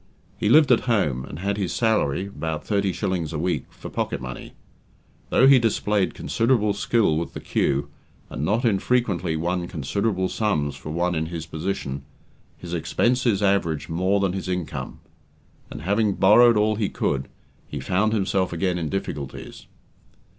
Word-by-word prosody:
He 105 - -1
lived 150 +1 +6
at 120 - +6
home, 75 - +1
and 70 - -8
had 100 +3 -2
his 95 -4 -2
salary 105 - +1
about 80 -6 -5
thirty 100 -2 +1
shillings 85 -3 -2
a - - -2
week 90 +4 -1
for - - -10
pocket 70 - -3
money. 65 0 -8 0.8
Though 130 - +4
he 135 -1 +8
displayed 105 -3 0
considerable 115 -3 +1
skill 100 -6 +1
with 85 - -5
the - - -4
cue, 70 +1 0 0.4
and 65 - -5
not 110 - +1
infrequently 100 -5 +1
won 85 +2 -1
considerable 95 +6 -1
sums 90 -7 -1
for - - -9
one 85 +3 0
in 80 -1 -1
his 80 -2 -5
position, 80 -4 -4 0.6
his 85 -1 -8
expenses 120 +5 +1
averaged 90 -7 +1
more 95 +5 +1
than 95 -2 0
his 95 -1 -4
income; 90 -3 -4 0.7
and - - -8
having 100 +2 +1
borrowed 115 +4 +6
all 105 0 +2
he 105 -3 0
could, 70 -1 -1 0.4
he - - -5
found 105 +4 +1
himself 95 -3 0
again 90 +1 -1
in 80 -2 -3
difficulties. 75 -7 -6
95 Hz, 160 wpm, -24 LUFS, 80-105 Hz, 0.8 s, he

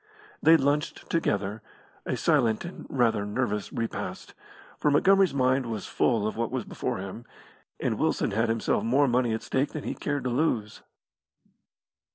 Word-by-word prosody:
They 165 0 +7
lunched 145 +1 -1
together; 105 -9 0 0.5
a - - -1
silent 110 +5 +2
and 175 - -9
rather 115 -5 +2
nervous 105 -1 -2
repast, 115 -1 -4 0.5
for 150 - +2
Montgomery's 190 +2 +4
mind 130 -1 +2
was 110 -4 -4
full 115 -4 +1
of 110 - -2
what 115 0 -1
was 130 -3 -3
before - - -3
him, 95 +4 -7 0.6
and - - -1
Wilson - - +1
had 115 +3 +1
himself 115 0 0
more 135 +5 +3
money 120 -1 +2
at 110 - -2
stake 135 +2 -1
than 155 - -5
he - - -3
cared 145 -1 -3
to 125 - -1
lose. 120 -6 -1
120 Hz, 160 wpm, -27 LUFS, 110-140 Hz, 0.6 s, They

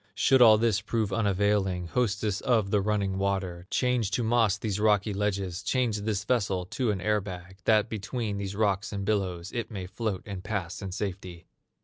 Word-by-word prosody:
Should 130 -1 +4
all 110 -3 +8
this 110 -2 +1
prove 110 -1 -1
unavailing, 100 -3 +1
Hostess 105 -3 0
of 110 -6 +1
the 105 - +3
running 100 -2 0
water, 95 -3 -2
Change 125 -5 +1
to 120 - -1
moss 115 -3 +3
these 105 -2 -2
rocky 105 -1 +2
ledges, 100 -3 -2
Change 120 -5 0
this 100 -2 -2
vessel 100 -6 0
to 120 +6 -2
an 100 -3 0
air 105 +2 +1
bag, 95 -1 -9
That 110 -1 +4
between 105 0 -3
these 100 0 -4
rocks 100 -2 0
and 100 -2 -3
billows 95 -4 -1
It 120 -2 -3
may 95 -4 -5
float, 100 +1 -3
and 100 -3 -6
pass 100 -4 -4
in 95 -2 -5
safety! 95 -3 -5
100 Hz, 180 wpm, -28 LUFS, 95-110 Hz, -, all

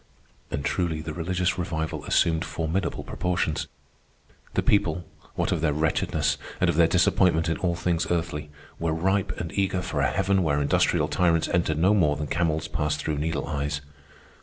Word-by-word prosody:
And 70 - -3
truly 85 -4 0
the 80 -1 -5
religious 90 +2 -1
revival 80 -2 -3
assumed 80 -1 +2
formidable 80 +4 -2
proportions. 85 -4 -1 0.9
The - - +2
people, 90 -4 +2 0.3
what - - 0
of - - 0
their 75 -2 +2
wretchedness, 75 -2 0 0.2
and 90 -1 +3
of - - -5
their 85 0 +5
disappointment 85 -1 +3
in 80 - 0
all 85 -2 0
things 85 0 0
earthly, 80 -3 -2 0.3
were 85 -1 0
ripe 95 +4 +1
and 85 - -4
eager 95 -2 0
for 75 -4 -2
a 70 - +3
heaven 95 +6 +1
where 75 -4 +1
industrial 70 - +2
tyrants 85 -2 +2
entered 85 -3 +1
no 90 +6 +4
more 80 -8 +3
than 75 +1 -3
camels 80 0 0
passed 75 -1 -1
through 75 -1 -2
needle 80 0 -1
eyes. 75 -1 -2
80 Hz, 170 wpm, -26 LUFS, 75-90 Hz, 0.9 s, their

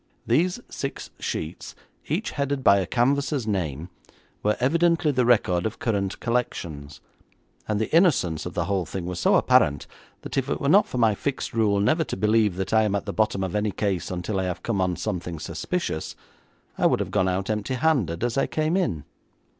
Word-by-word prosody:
These 180 +7 +2
six 135 - -6
sheets, 80 +2 -5 0.3
each - - -1
headed 140 -1 -2
by 100 -3 +6
a 95 - -2
canvasser's 135 +1 +1
name, 85 -6 -2 0.5
were 105 +1 +1
evidently 165 +3 +2
the 125 -3 +1
record 90 -7 +3
of 110 - -7
current 100 -4 -1
collections, 85 -12 -3 0.7
and 105 -1 0
the 110 +8 -1
innocence 125 - +3
of 90 - -8
the 90 - 0
whole 95 -3 -1
thing 95 -3 -5
was 90 0 -4
so - - +4
apparent 70 -1 +3 0.4
that - - -6
if 135 +1 -4
it - - -1
were 140 - -1
not 200 +6 +5
for - - -5
my 115 -3 +4
fixed 135 +6 -3
rule 105 -3 +2
never 155 - +2
to - - -5
believe 105 -1 +2
that 95 +3 -3
I 110 - +5
am 105 -2 +1
at 100 - -2
the 100 - -4
bottom 110 -3 +1
of 95 - -3
any 105 0 0
case 100 -3 -2
until 95 +3 -2
I 95 - -1
have 90 -1 -4
come 105 -5 -1
on 90 -1 +1
something 90 -5 -4
suspicious, 170 - -3 0.6
I - - +5
would - - +1
have - - -3
gone 95 - +2
out 95 +3 -1
empty 105 +4 -2
handed 125 - +1
as 120 +2 0
I - - +1
came 155 +2 0
in. 95 - 0
105 Hz, 200 wpm, -25 LUFS, 90-130 Hz, 0.7 s, by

